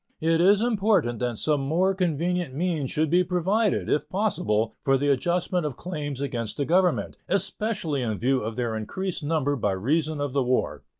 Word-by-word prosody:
It 165 +1 +2
is 200 +4 +5
important 200 - +1
that 120 -2 -2
some 150 +2 +1
more 170 +8 +1
convenient 175 -4 -1
means 160 -4 -1
should 155 0 0
be 180 +1 +4
provided, 190 +4 +1
if 150 - 0
possible, 115 - 0
for 135 -2 +3
the 145 +2 0
adjustment 175 +5 +1
of 150 -5 -4
claims 150 -6 -5
against 120 -6 -3
the 140 - 0
Government, 180 +3 +1
especially 190 - -1
in 110 -4 -2
view 130 +3 +1
of 110 +1 -4
their 120 -2 -2
increased 185 - -3
number 145 -2 0
by 105 -6 0
reason 150 - 0
of 145 -2 -2
the 140 -2 +2
war. 125 +1 0
155 Hz, 180 wpm, -25 LUFS, 130-180 Hz, -, is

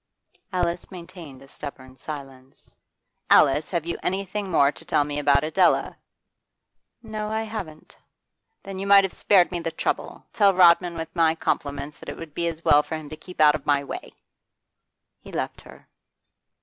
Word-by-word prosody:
Alice 175 -2 -2
maintained 170 -7 -11
a - - -16
stubborn 130 -2 -10
silence. 135 -2 -10 0.5
'Alice, 145 +3 +5
have 170 -3 -2
you 170 - -4
anything 195 +1 -3
more 140 -5 +4
to 160 - -10
tell 165 -3 +2
me 145 0 -4
about 140 -1 +3
Adela?' 175 +4 +2 1.1
'No, 215 -1 -5
I 220 +1 -1
haven't.' 195 -9 -8 0.7
'Then 195 -1 -7
you 195 - -4
might 200 0 +7
have 195 - -2
spared 190 -3 +3
me 175 - -2
the 165 - -3
trouble. 160 - -3
Tell 200 -3 +4
Rodman 175 -1 +5
with 160 +2 -6
my 165 -1 +3
compliments 145 -2 -3
that - - -9
it - - -7
would 165 -3 -9
be 170 +1 -1
as 165 0 -5
well 145 0 +6
for 160 - -6
him 155 -2 -8
to 155 - -7
keep 180 +3 -13
out 150 -1 +7
of 150 -2 -6
my 145 -1 +2
way.' - - -8 1.0
He - - -13
left - - -4
her. - - -16
165 Hz, 175 wpm, -24 LUFS, 145-185 Hz, 1.1 s, might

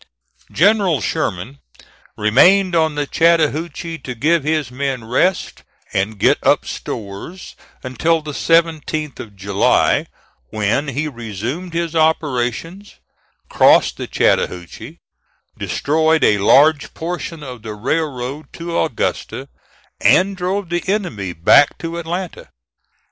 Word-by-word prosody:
General 195 -4 +3
Sherman 115 +11 -3 0.6
remained 180 - +4
on 160 -2 +2
the 145 0 -1
Chattahoochee 165 +1 0
to 125 - -7
give 155 +6 +1
his 155 -4 -1
men 130 -2 -3
rest 130 +11 0 0.3
and 100 +3 -1
get - - +3
up - - +3
stores 105 - -7 0.3
until 155 +6 0
the 150 - -6
17th 155 -2 0
of 105 -3 -9
July, 100 +1 +1 0.4
when 110 +7 -1
he 145 +3 -2
resumed 120 - -6
his 170 -1 -2
operations, 160 - -1 0.5
crossed - - +4
the - - -5
Chattahoochee, 105 - -1 0.6
destroyed 160 +1 +1
a 105 - +4
large 145 +8 +4
portion 165 -1 -5
of 125 -4 -9
the 110 -1 -7
railroad 135 +3 -3
to 170 0 -6
Augusta, 140 -8 -3 0.5
and 195 +2 +3
drove 185 0 -3
the 175 0 -1
enemy 175 - -2
back 90 - +4
to 165 0 -5
Atlanta. 175 +2 -5
155 Hz, 115 wpm, -18 LUFS, 120-170 Hz, 0.6 s, remained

